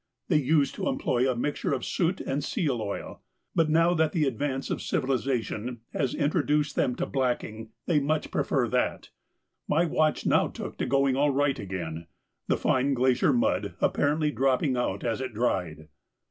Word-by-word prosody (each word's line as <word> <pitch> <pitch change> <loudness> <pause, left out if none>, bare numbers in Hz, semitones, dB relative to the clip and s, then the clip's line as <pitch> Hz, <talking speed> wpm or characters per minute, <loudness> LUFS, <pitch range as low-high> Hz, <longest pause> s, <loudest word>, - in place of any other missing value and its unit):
They 155 -5 +4
used 145 0 +2
to - - -3
employ 135 - +1
a 130 - 0
mixture 145 +5 -1
of - - -2
soot 180 +1 0
and 140 +1 -2
seal 145 - -1
oil, 100 -2 -5 0.3
but 160 -2 +2
now 165 +2 +4
that 160 -2 +1
the 155 -4 +2
advance 135 +1 -2
of - - -2
civilisation 125 -3 -2
has 135 -4 -1
introduced 150 -1 +1
them 125 - +1
to - - -2
blacking, 120 -4 -2 0.2
they 165 -4 +3
much 150 +2 -1
prefer - - +1
that. - - -1 0.6
My 165 +4 +3
watch 155 -1 +1
now - - +3
took - - -8
to - - -1
going 135 0 +2
all 145 +2 +3
right 140 0 +1
again, 85 -4 -5 0.4
the - - +2
fine 135 +2 +1
glacier 130 +1 +3
mud 100 -6 0
apparently 150 +1 +1
dropping 135 0 +1
out 100 -5 -2
as 115 +1 -1
it 130 -4 -5
dried. 85 -9 -1
135 Hz, 170 wpm, -27 LUFS, 120-150 Hz, 0.6 s, They